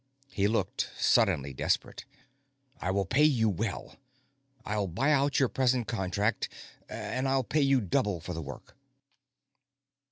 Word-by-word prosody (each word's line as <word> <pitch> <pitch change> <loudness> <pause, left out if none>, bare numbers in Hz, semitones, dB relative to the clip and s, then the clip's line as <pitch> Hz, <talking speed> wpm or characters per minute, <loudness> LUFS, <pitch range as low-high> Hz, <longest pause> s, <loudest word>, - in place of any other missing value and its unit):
He 100 -1 +1
looked 110 +2 -1
suddenly 85 - +2
desperate. - - -2 0.7
"I 90 - -2
will 100 +1 +1
pay 140 +10 +2
you 125 -7 +4
well. 100 +1 -4 0.7
I'll 105 -2 -1
buy 120 - +1
out 140 -1 +2
your 135 - +4
present 125 -1 +1
contract, 100 0 -1 0.4
and 130 +1 -3
I'll 135 0 +2
pay 150 +5 0
you 135 -2 +3
double 105 -2 0
for 90 +2 -6
the 80 - -4
work." 70 -2 -10
110 Hz, 135 wpm, -29 LUFS, 95-135 Hz, 0.7 s, you